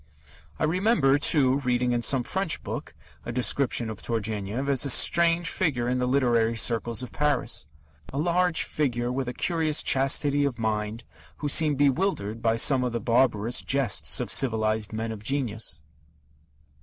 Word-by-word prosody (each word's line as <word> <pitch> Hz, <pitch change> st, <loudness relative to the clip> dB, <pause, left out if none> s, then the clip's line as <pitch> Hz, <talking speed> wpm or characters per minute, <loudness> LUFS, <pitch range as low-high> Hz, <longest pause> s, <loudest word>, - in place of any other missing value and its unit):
I -, -, -3 dB
remember, 160 Hz, -, +2 dB
too, 140 Hz, -3 st, +3 dB
reading 125 Hz, -2 st, 0 dB
in 120 Hz, -1 st, 0 dB
some 130 Hz, +1 st, +2 dB
French 190 Hz, +4 st, -2 dB
book -, -, -7 dB, 0.3 s
a -, -, -6 dB
description 125 Hz, 0 st, 0 dB
of 110 Hz, -2 st, -7 dB
Turgenev 110 Hz, +2 st, -3 dB
as 140 Hz, -2 st, +1 dB
a 140 Hz, -, +1 dB
strange 170 Hz, +5 st, +3 dB
figure 130 Hz, -10 st, -1 dB
in 125 Hz, +1 st, -1 dB
the 125 Hz, -, -1 dB
literary 120 Hz, -4 st, +1 dB
circles 115 Hz, +1 st, +1 dB
of 125 Hz, -, -8 dB
Paris 145 Hz, -, -1 dB, 0.4 s
a 135 Hz, -, -6 dB
large 175 Hz, +2 st, +1 dB
figure 120 Hz, -5 st, -2 dB
with 130 Hz, 0 st, -3 dB
a 125 Hz, -, -4 dB
curious 160 Hz, -3 st, 0 dB
chastity 140 Hz, +1 st, +2 dB
of 140 Hz, -4 st, -2 dB
mind 110 Hz, 0 st, -3 dB, 0.3 s
who 150 Hz, -, -4 dB
seemed 150 Hz, 0 st, +3 dB
bewildered 135 Hz, -, 0 dB
by 115 Hz, -1 st, +1 dB
some 130 Hz, +3 st, +4 dB
of 125 Hz, -2 st, -2 dB
the 120 Hz, -, -2 dB
barbarous 115 Hz, 0 st, +1 dB
jests 135 Hz, -1 st, 0 dB
of -, -, -4 dB
civilized 110 Hz, -3 st, 0 dB
men 110 Hz, +1 st, -4 dB
of 110 Hz, -2 st, -8 dB
genius. 110 Hz, -, -3 dB
125 Hz, 160 wpm, -25 LUFS, 115-145 Hz, 0.4 s, some